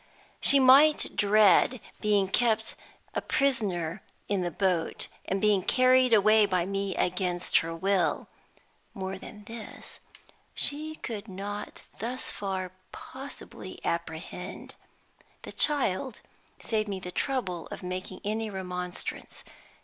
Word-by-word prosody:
She 280 - +7
might 275 +4 +6
dread 210 +4 +4 0.2
being 205 -2 +2
kept 225 +3 +1 0.4
a - - -1
prisoner 200 -10 0 0.3
in 200 -2 0
the 175 - -1
boat, 175 -2 0 0.2
and 195 - -1
being 205 -1 +3
carried 255 +4 +4
away 215 0 +6
by 180 -3 +1
me 195 0 -2
against 180 0 0
her 165 0 -4
will. 190 +1 0 0.7
More 190 0 -4
than 210 +1 -11
this 225 +1 -10 0.6
she 310 +2 0
could 220 -7 -6
not 200 +2 -6 0.2
thus 245 +4 -4
far 190 -2 -4 0.2
possibly 270 +2 -9
apprehend. - - -5 0.7
The - - -8
child 260 -5 +1 0.4
saved 215 -2 -1
me 195 -1 -3
the 180 -1 -7
trouble 185 - -2
of - - -8
making 185 +1 -5
any 220 +2 -2
remonstrance. 180 -2 -6
200 Hz, 120 wpm, -28 LUFS, 185-235 Hz, 0.7 s, She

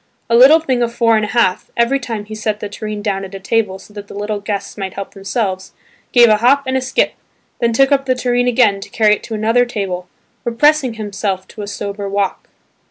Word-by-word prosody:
A - - +5
little 270 +7 +8
thing 260 -6 -1
of 235 -1 0
four 235 -1 +3
and 215 - +1
a - - -1
half, 215 -4 +1
every 235 +4 +2
time 225 -5 -5
he 215 - -9
set 215 -1 -2
the 210 - -4
tureen 210 0 -6
down 195 -2 -1
on 195 0 -8
a - - -6
table 205 -1 0
so 210 - -17
that 205 -1 -9
the - - -11
little 205 +1 -3
guests 205 -1 -4
might 195 -2 -5
help 195 -1 -6
themselves, 195 -1 -3 0.4
gave 240 -2 +7
a 215 -1 +4
hop 265 +6 +3
and 260 0 -1
a 260 - +1
skip, 260 +1 0 0.5
then 235 -1 +2
took 270 +4 +3
up 275 -1 +2
the 255 - +2
tureen 245 0 0
again 230 -5 +3
to 195 - -9
carry 215 -2 +3
it - - -19
to 225 - -5
another 225 +3 +2
table, 195 -7 -4 0.4
repressing 260 +1 +2
himself 200 -3 -3
to 215 - -9
a 205 - -5
sober 200 0 -5
walk. 200 -1 -2
215 Hz, 235 wpm, -17 LUFS, 200-245 Hz, 0.5 s, little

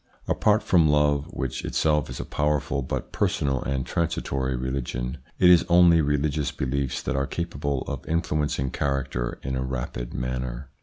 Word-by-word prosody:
Apart 105 0 +2
from 85 -4 +4
love, 75 -1 +3
which 65 -7 -4
itself 75 -2 +1
is - - -6
a - - -4
powerful 75 -2 0
but 65 - -4
personal 70 -2 0
and 65 -2 -2
transitory 65 -4 -1
religion, 65 0 -3 0.2
it 90 - +5
is 90 - +7
only 85 -1 +6
religious 75 0 0
beliefs 70 0 -2
that - - -2
are 70 0 0
capable 70 -5 -2
of 70 -3 -6
influencing 75 -5 0
character 70 -4 -2
in 65 0 -2
a 65 - -1
rapid 60 -2 -4
manner. 65 +1 -4
70 Hz, 155 wpm, -25 LUFS, 65-75 Hz, 0.2 s, is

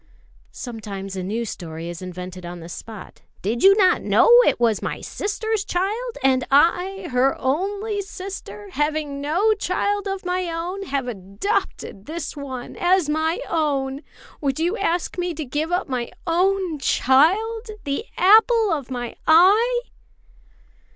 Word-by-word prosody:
'" - - -32
Sometimes 200 -5 -7
a 190 - -3
new 215 +6 -2
story 165 -5 -7
is 175 0 -7
invented 180 0 -7
on 175 0 -7
the 165 0 -10
spot. 215 +3 -10 0.2
"Did 225 +5 -1
you 395 +1 +7
not 375 -3 +4
know - - +4 0.2
it - - +2
was 230 -3 +2
my - - -3
sister's 435 0 -2
child; 425 +7 -2
and 260 -1 +3
I, 355 +6 +2
her 255 +2 +2
only 405 +9 -1
sister, 395 +1 -8
having 295 -3 -1
no 355 +10 +2
child 405 0 -1
of 390 -1 -4
my 360 0 -1
own, 350 +4 -4
have 270 -2 -2
adopted 200 - -3
this 315 0 -5
one 265 -4 -7
as 355 -3 +2
my 315 +2 0
own? 280 -4 -1 0.4
Would 275 -1 -1
you 345 +5 +1
ask 360 -4 -1
me 355 -1 -2
to 310 0 -4
give 295 +6 -2
up 360 +2 0
my 250 -3 -3 0.2
own 360 -1 +1
child, 385 - +2 0.2
the 280 +9 -2
apple 440 +2 +5
of 280 -5 -4
my 245 -2 -5
eye?" 415 +10 +5
315 Hz, 150 wpm, -22 LUFS, 250-390 Hz, 0.4 s, you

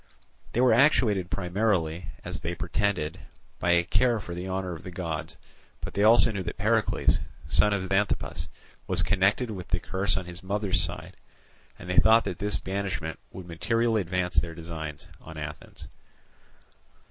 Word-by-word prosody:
They 120 - +2
were 125 -2 +5
actuated 110 - +3
primarily, 90 -4 0 0.2
as - - -3
they 85 +1 -3
pretended, 85 -4 -1 0.4
by 85 - 0
a 85 0 +4
care 110 +6 +2
for 90 -3 -7
the 90 +2 -5
honour 95 -1 -2
of 80 - -8
the - - -8
gods; 85 -4 -5 0.4
but - - -6
they 100 - 0
also 115 +2 +7
know 100 -3 -3
that 90 - -5
Pericles, 110 +2 +2 0.3
son 105 - +4
of 95 -2 -1
Xanthippus, 90 -5 -1 0.4
was - - +2
connected 100 +5 +2
with 95 -4 -7
the 90 - 0
curse 95 +2 0
on 95 - -3
his 90 +1 -8
mother's 100 0 0
side, - - -5 0.6
and - - -11
they 90 - -2
thought 115 +1 +6
that - - -5
his 105 0 +2
banishment 95 -4 -3
would 95 - -9
materially 115 +6 +1
advance 90 0 -2
their 85 -1 +1
designs 80 -3 -7
on 80 - -10
Athens. 75 -1 -8
95 Hz, 165 wpm, -27 LUFS, 85-105 Hz, 0.6 s, also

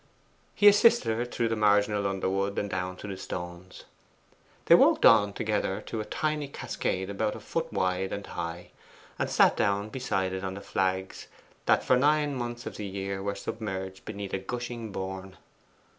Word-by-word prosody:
He 205 - +5
assisted 205 - +6
her 120 +2 -1
through 120 -1 -1
the 115 - 0
marginal 105 -1 +3
underwood 95 +1 -1
and 105 - 0
down 90 -1 -3
to 105 - -8
the 100 - -4
stones. 90 0 -7 0.8
They - - +7
walked - - +6
on 105 -2 +7
together 105 -2 -1
to 110 - -4
a - - -6
tiny 150 +2 -2
cascade 95 -8 -3
about 105 +1 -1
a - - -7
foot 165 -1 -3
wide 95 +1 0
and 100 - -4
high, 85 +1 -6 0.5
and - - 0
sat - - +5
down 100 +1 0
beside 95 -7 -1
it 95 0 -4
on 95 0 -3
the 100 - -7
flags 95 -1 -2 0.4
that - - +4
for 130 - +4
nine 150 +1 +2
months 120 -1 -5
in - - -5
the 105 - -5
year 95 0 -4
were 100 0 -2
submerged 95 -3 -5
beneath 100 -2 -6
a 95 - 0
gushing 120 +2 -5
bourne. 95 0 -6
100 Hz, 175 wpm, -28 LUFS, 95-115 Hz, 0.8 s, They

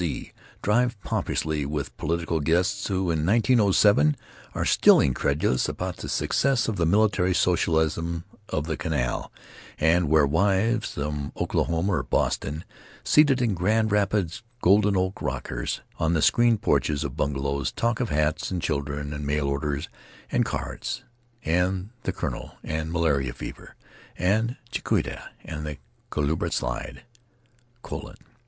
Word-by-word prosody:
C. 85 -4 -3 0.3
drive 120 +2 +2
pompously 80 -2 -1
with 70 0 -4
political 85 +1 -1
guests 85 +5 +1
who, 95 -3 0
in 80 -2 0
1907, 100 - +4 0.4
are - - -1
still - - +6
incredulous 70 -1 +1
about - - -4
the - - -6
success 130 -5 +1
of 110 -3 -2
the 85 - +2
military 95 -1 +3
socialism 85 -1 +1 0.3
of 75 - -1
the 80 -1 -2
Canal, 70 -7 -2 0.5
and 80 +1 +3
where 75 -1 +5
wives 100 +9 +1
from 75 0 -3
Oklahoma 85 +4 0
or 90 - +1
Boston, 75 +4 -1 0.4
seated 140 -4 +4
in 115 -4 +2
Grand 110 +4 +1
Rapids 100 -1 +1 0.2
golden 100 +1 +4
oak 95 +1 -1
rockers - - -3 0.2
on 80 +1 +2
the 80 - +2
screened 120 -3 +4
porches 75 -2 +1
of - - -4
bungalows, 70 0 -1
talk 115 0 0
of 120 -4 -1
hats, 75 +1 0
and 90 - -2
children, 70 -1 -2
and 75 0 -5
mail 70 0 0
orders, 70 +1 -2 0.4
and - - +3
cards, 125 +3 -4 0.4
and 90 +4 0
The - - +1
Colonel, - - -5
and 80 +1 -3
malarial 70 -7 +1
fever, - - -9 0.4
and 110 +6 +1
Chautauqua, - - -2 0.2
and 75 -2 -5
the 75 -1 -5 0.3
Culebra 75 +1 -1
slide. - - -3 0.8
Colon! - - -7
85 Hz, 135 wpm, -25 LUFS, 75-100 Hz, 0.8 s, still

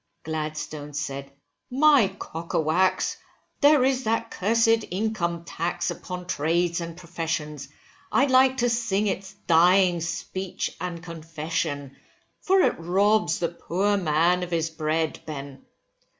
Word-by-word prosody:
Gladstone 155 -1 -5
said, 140 -1 -4 0.4
my 275 -3 +5
Cockawax, 170 +3 0 0.4
there 290 -2 +6
is 260 -2 +1
that 225 +1 0
cursed 225 +2 +2
income 180 -4 -2
tax 175 +2 -2
upon 180 -1 -7
trades 170 +1 0
and 165 0 -6
professions, 165 -4 -4 0.4
I'd 275 0 +3
like 260 0 +5
to 245 -1 +2
sing 225 -3 0
its 195 -1 -3
dying 175 +1 +4
speech 185 +2 -4
and 175 -2 -5
confession, 160 -4 -4 0.4
for 380 0 +3
it - - +2
robs 200 +6 +2
the 170 - -1
poor 190 +4 0
man 175 0 +2
of 180 - -4
his 165 -1 -1
bread, 160 0 -1
Ben. 140 -3 -7
175 Hz, 120 wpm, -25 LUFS, 160-205 Hz, 0.4 s, there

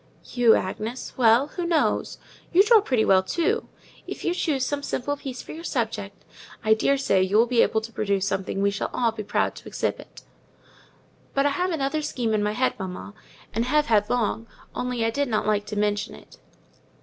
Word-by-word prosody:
"You, 240 -3 +5
Agnes! 220 +6 -4
well, 240 +3 +4
who 355 - -4
knows? 340 -2 0 0.3
You 370 +3 +6
draw 440 0 +6
pretty 250 - +1
well, 190 -1 +5
too: 345 - -1 0.4
if - - -6
you 345 - +2
choose 290 -7 0
some 290 +1 -2
simple 285 0 -2
piece 265 -3 -7
for - - -10
your 325 +1 -8
subject, 220 - -3 0.4
I 220 - +5
daresay 265 -3 +2
you 190 +3 +2
will 230 - +6
be 240 -1 +3
able 220 - +2
to 225 +1 -8
produce 200 -3 0
something 195 0 -2
we 200 - +3
shall 200 - -3
all 235 -2 +2
be 220 -1 -6
proud 205 - 0
to - - -11
exhibit." - - -4 1.1
"But 275 0 +2
I - - +4
have 360 +6 0
another 310 -2 -1
scheme 245 -6 -2
in 215 - +1
my 210 0 0
head, 255 +4 +1
mamma, 190 +1 -6 0.4
and 230 +1 0
have 300 +3 +2
had 210 -4 +2
long, 230 -1 -1 0.3
only 250 -2 -2
I 225 - +1
did 285 +4 0
not 220 -3 0
like 210 -1 0
to 210 - -5
mention 205 0 -1
it." - - -17
235 Hz, 195 wpm, -25 LUFS, 210-280 Hz, 1.1 s, You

